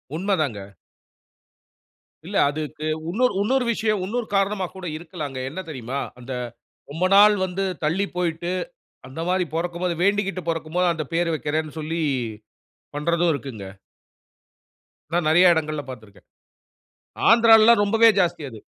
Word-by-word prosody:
உண்மதாங்க. 160 - -1 1.7
இல்ல. - - -7
அதுக்கு 155 +1 -5 0.2
உன்னொரு 250 +8 +1
உன்னொரு 255 +4 +1
விஷயம் 215 -2 0
உன்னொரு 230 +3 -3
காரணமா 195 0 +1
கூட 190 - -8
இருக்கலாங்க. 155 -5 -7
என்ன 160 +7 -7
தெரியுமா? 130 -2 -5 0.2
அந்த 125 +2 -7 0.6
ரொம்ப 165 +5 -1
நாள் 210 +1 +7
வந்து 185 +1 -3 0.2
தள்ளி 170 +7 +1
போய்ட்டு, 175 -1 -2 0.6
அந்த 130 +5 -8
மாரி 185 0 +1
பொறக்கும்போது 175 +1 -2
வேண்டிக்கிட்டு 195 -2 0
பொறக்கும் 165 0 -3
போது 180 0 +3
அந்த 160 -2 -4
பேரு 170 -1 +1
வெக்கிறேன்னு 155 0 -3
சொல்லி 160 +2 -3 1.0
பண்றதும் 170 +3 +1
இருக்குங்க. 130 -8 -7 1.5
நான் 170 -2 +1
நெறைய 175 +2 +6
இடங்கள்ல 155 -2 -2
பாத்திருக்கேன். 110 -5 -12 1.0
ஆந்திராலல்லாம் 225 -1 +7
ரொம்பவே 225 +2 +5
ஜாஸ்தி 175 -4 0
அது. 110 -3 -11
170 Hz, 120 wpm, -23 LUFS, 155-195 Hz, 1.7 s, நாள்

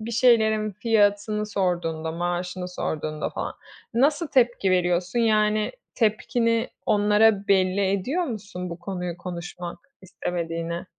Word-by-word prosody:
bir 225 +2 -5
şeylerin 220 -3 +3
fiyatını 210 0 +1
sorduğunda, 170 -5 -1
maaşını 175 +1 -3
sorduğunda 155 -3 -3
falan - - -4 0.4
nasıl 295 +6 +2
tepki 240 -6 +2
veriyorsun? 180 +3 +1
Yani 215 -1 +2 0.2
tepkini 230 +1 +1 0.2
onlara 210 0 +3
belli 190 0 +3
ediyor 270 - 0
musun 200 - -6
bu 170 - -6
konuyu 180 -1 -4
konuşmak 175 -1 -6 0.2
istemediğini? 170 -2 -4
200 Hz, 110 wpm, -25 LUFS, 175-220 Hz, 0.4 s, şeylerin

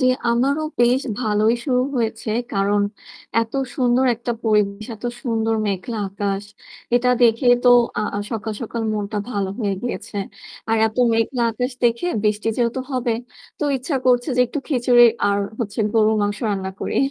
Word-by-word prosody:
জ্বি, 255 - +3 0.2
আমারও 275 +6 +1 0.2
বেশ 245 +2 +4 0.2
ভালোই 215 -1 +2
শুরু 250 -2 +2
হয়েছে। 225 -2 -2 0.2
কারণ 200 0 +2 0.6
এত 225 - -8 0.2
সুন্দর 250 0 +3
একটা 235 +1 -3
পরিবেশ 210 -1 +1
এত 220 - -15 0.2
সুন্দর 225 -3 0
মেঘলা 205 +4 -3
আকাশ। 200 0 -3 0.5
এটা 245 +1 +3
দেখে 230 +2 +4 0.2
তো 250 - +5 0.6
সকাল 220 -1 -3
সকাল 230 0 -4
মনটা 210 0 -2
ভালো 200 -4 -1
হয়ে 200 -3 0
গিয়েছে। 240 -3 -5 0.5
আর 225 - +2
এত 220 - -6 0.2
মেঘলা 230 +2 0
আকাশ 250 +4 -2
দেখে 235 +7 +2 0.2
বৃষ্টি 210 +1 0
যেহেতু 240 +1 0
হবে 250 -2 0 0.5
তো - - -1
ইচ্ছা 275 +3 -4
করছে 245 +2 +3
যে 250 - +4
একটু 295 - -4
খিচুড়ি 245 -3 +5 0.2
আর 200 0 +1 0.2
হচ্ছে 210 -1 -4
গরুর 220 -1 +3
মাংস 205 0 -1
রান্না 190 -2 -2
করি। - - -3
225 Hz, 155 wpm, -21 LUFS, 210-245 Hz, 0.6 s, তো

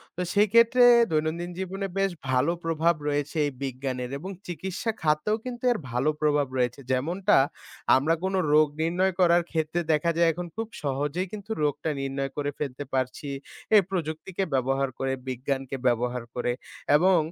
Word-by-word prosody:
তো 180 - -3
সেই 210 +1 +4
ক্ষেত্রে 235 +2 +6 0.3
দৈনন্দিন 160 +3 -1
জীবনে 195 +1 -3
বেশ 195 -1 +2 0.2
ভালো 130 +5 +3
প্রভাব 165 +1 +2
রয়েছে 145 +2 -1
এই - - -3
বিজ্ঞানের 130 -1 -3
এবং 185 - -7 0.2
চিকিৎসা 190 +5 -3
খাতেও 155 +7 +2
কিন্তু 245 -1 -6
এর 240 - +1
ভালো 125 +5 +1
প্রভাব 145 -2 +2
রয়েছে, 125 +1 0
যেমনটা 175 +10 +2 0.6
আমরা 145 +5 +2
কোন 190 +1 -1 0.2
রোগ 155 0 +6
নির্ণয় 180 +3 +1
করার 175 -1 +5
ক্ষেত্রে 160 +1 0
দেখা 170 +3 +2
যায় 170 -1 +5
এখন 175 +1 -5
খুব 225 0 -3 0.2
সহজেই 145 +6 -1
কিন্তু 215 +1 -7
রোগটা 150 +2 0
নির্ণয় 135 0 -3
করে 145 0 -1
ফেলতে 140 -1 -4
পারছি। 130 +2 -2 0.5
এই 205 - +9
প্রযুক্তিকে 175 +1 -3
ব্যবহার 135 +1 +1
করে, 135 0 0
বিজ্ঞানকে 135 +1 -3
ব্যবহার 120 0 0
করে 125 0 0 0.4
এবং 180 +4 +5
155 Hz, 155 wpm, -26 LUFS, 135-180 Hz, 0.6 s, এই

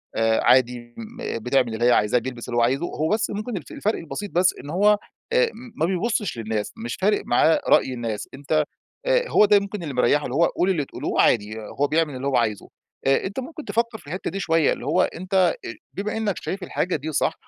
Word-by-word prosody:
آآ، 115 0 +2
عادي 120 -1 +3
م 230 - -5
بتعمل 125 0 +1
اللي 115 +2 0
هي 125 - +6
عايزاه، 115 +1 +3
بيلبَس 120 -1 -7
اللي 120 - -2
هو - - +4
عايزه. 135 +7 +1
هو 155 -2 -2
بس 215 +1 +1
ممكن 215 +2 -4
الف 155 - -9
الفرق 215 +2 -1
البسيط 195 +5 -6
بس، 180 +1 +3
إن 145 - -9
هو 205 +5 +4 0.4
آآ، 485 -1 +4 0.3
ما 160 - +1
بيبُصِّش 195 - -1
للناس، 110 -2 -3
مش 120 +2 -4
فارق 205 +2 +1
معاه 155 +6 +3
رأي 130 - +4
الناس. 115 -4 -4
أنتَ 145 +3 0 0.4
آآ، - - +2
هو 210 - +6
ده 205 0 +5
ممكن 200 -1 -6
اللي 150 -4 -4
مريِّحه، 125 +4 +3
اللي 125 - -4
هو 170 +3 +5
قولوا 190 +3 +1
اللي 150 -5 -1
تقولوه، - - -1
عادي 110 0 +2
هو 140 +7 -1
بيعمل 155 -2 +1
اللي 130 +2 -3
هو 140 - +2
عايزه. 110 -4 -1 0.4
آآ، 135 - +3
أنتَ 200 +6 -4
ممكن 305 +3 -7
تفكر 230 0 -1
في 155 - -18
الحتَّة 180 +6 -4
دي 195 - -4
شوية. 165 -4 +2
اللي - - -8
هو - - +2
أنتَ 185 -1 +1 0.4
بما 210 +3 -3
إنَّك 210 -4 0
شايِف 195 0 -4
الحاجة 180 0 -1
دي 155 +2 -4
صح، 145 - +1
160 Hz, 220 wpm, -23 LUFS, 125-200 Hz, 0.4 s, هي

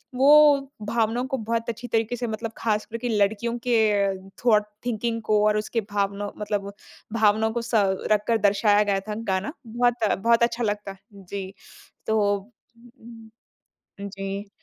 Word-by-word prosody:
वो 285 0 +6 0.2
भावनाओं 230 +2 0
को 265 -1 -2
बहुत 230 +1 -2
अच्छी 235 +2 -5
तरीके 225 +1 0
से, 240 0 -3
मतलब 220 +1 -4
खासकर 215 0 -2
के 245 - 0
लड़कियों 220 +4 0
के 200 -4 +1 0.2
थॉट 210 -3 +4 0.2
थिंकिंग 230 -1 -2
को 210 -1 +4
और 210 0 +2
उसके 220 +2 -1
भावनौ 200 0 -1
मतलब 205 -1 -3 0.5
भावनाओं 220 +1 +3
को 235 - -1
स 235 +1 -8 0.4
रखकर 215 +2 +2
दर्शाया 205 +1 +3
गया 200 -2 0
था, 210 +2 -6
गाना। 200 +4 -2
बहुत, 235 -3 +1
बहुत 230 +3 +3
अच्छा 235 0 0
लगता। 205 -2 -3 0.2
जी, 195 0 -7 0.5
तो 220 -1 +2 0.2
उम, 230 +2 -16 0.7
हुँ, 200 - -5
हुँ। - - -5
जी। 195 +1 -5
220 Hz, 150 wpm, -24 LUFS, 205-235 Hz, 0.7 s, वो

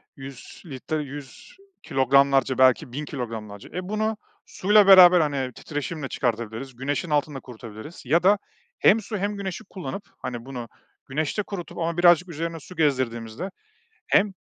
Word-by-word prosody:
100 135 -2 -11
litre, 150 +1 -4
100 140 - -11 0.3
kilogramlarca 135 0 +3
belki 130 +1 +4
1000 150 +3 -4
kilogramlarca. 110 -7 -7
Eee, - - -3
bunu 215 +3 -2 0.3
suyla 205 +1 +4
beraber, 185 -2 +9
hani, 135 -4 -1
titreşimle 145 +1 -5
çıkartabiliriz, 120 +1 -3
güneşin 145 +7 -3
altında 145 -1 0
kurutabiliriz 115 +4 -11
ya 165 +7 +2
da 200 +2 +5 0.4
hem 225 - +5
su 215 +1 -5
hem 205 +1 -2
güneşi 190 -3 -5
kullanıp, 185 +1 -6
hani 120 -2 -6
bunu 125 -3 -7 0.4
güneşte 155 +9 -1
kurutup 180 -5 -7
ama 170 0 -2
birazcık 175 0 +5
üzerine 165 +1 -4
su 180 +5 -13
gezdirdiğimizde 130 - -1 0.6
hem 200 0 +3
145 Hz, 140 wpm, -24 LUFS, 130-180 Hz, 0.6 s, beraber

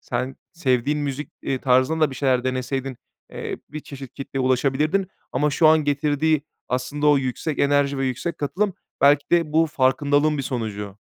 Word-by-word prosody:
sen 130 +2 -3 0.2
sevdiğin 140 -2 +1
müzik, 145 0 -4
eee, 135 - -1
tarzında 130 +5 +2
da 155 -3 +3
bir - - -7
şeyler 130 -2 +1
deneseydin, 130 +1 -2 0.4
eee, - - -5
bir 155 +2 -6
çeşit 135 -4 -10
kitleye 135 -1 -5
ulaşabilirdin 140 +8 +1 0.3
ama 145 +3 +1
şu 155 +3 +3
an 155 -1 +5
getirdiği 145 +1 +1 0.3
aslında 130 +4 -1
o 145 -1 +6
yüksek 135 +4 -3
enerji 140 -1 +2
ve 135 - 0
yüksek 130 +7 -3
katılım 185 +7 -1 0.3
belki 145 +1 +5
de 165 -3 +3
bu 165 +1 +4
farkındalığın 145 +2 +2
bir - - -1
sonucu. 105 -6 -4
140 Hz, 170 wpm, -23 LUFS, 130-150 Hz, 0.4 s, o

